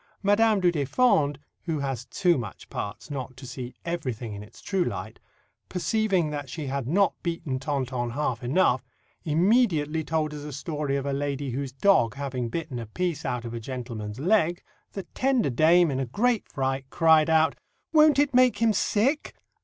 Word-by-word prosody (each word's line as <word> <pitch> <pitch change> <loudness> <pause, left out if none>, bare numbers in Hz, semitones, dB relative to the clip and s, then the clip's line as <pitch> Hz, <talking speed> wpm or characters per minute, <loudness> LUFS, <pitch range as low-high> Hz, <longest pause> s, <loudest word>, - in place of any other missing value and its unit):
Madame 210 +1 +4
du 180 -2 +3
Deffand, 145 - +2 0.3
who 165 -3 -1
has 135 -4 -3
too 175 -2 +2
much 115 -6 -7
parts 105 +8 -6
not 130 -2 -5
to 130 - -10
see 125 0 -7
everything 125 -10 -3
in 100 - -7
its 105 +2 -14
true 195 -2 0
light, - - -5 0.5
perceiving 185 -2 0
that 145 -2 -5
she 155 +3 -5
had 135 -2 -3
not 195 +7 +3
beaten 165 -6 -3
Tonton 130 -3 -2
half 130 -1 -2
enough, 130 -2 +2 0.4
immediately 160 -3 +2
told 155 -1 -1
us 150 - -6
a 150 - -6
story 145 0 -3
of 140 0 -2
a 140 - -1
lady 140 -1 -2
whose 135 +1 -3
dog 130 - +3
having 130 -4 -3
bitten 150 -2 -4
a 115 - -6
piece 170 +5 -2
out 125 -1 -2
of 115 - -6
a 115 - -4
gentleman's 115 -3 -6
leg, 175 0 +2 0.3
the 195 - -5
tender 255 - +1
dame, 160 +5 +4
in 135 - -1
a 135 - -2
great 230 - +1
fright, 135 0 -2
cried 160 -1 +4
out, 160 0 +3 0.4
'Won't 305 -2 +6
it 285 -1 +2
make 250 -3 +5
him 225 0 +3
sick?'" 245 +9 0
150 Hz, 175 wpm, -26 LUFS, 130-180 Hz, 0.5 s, Won't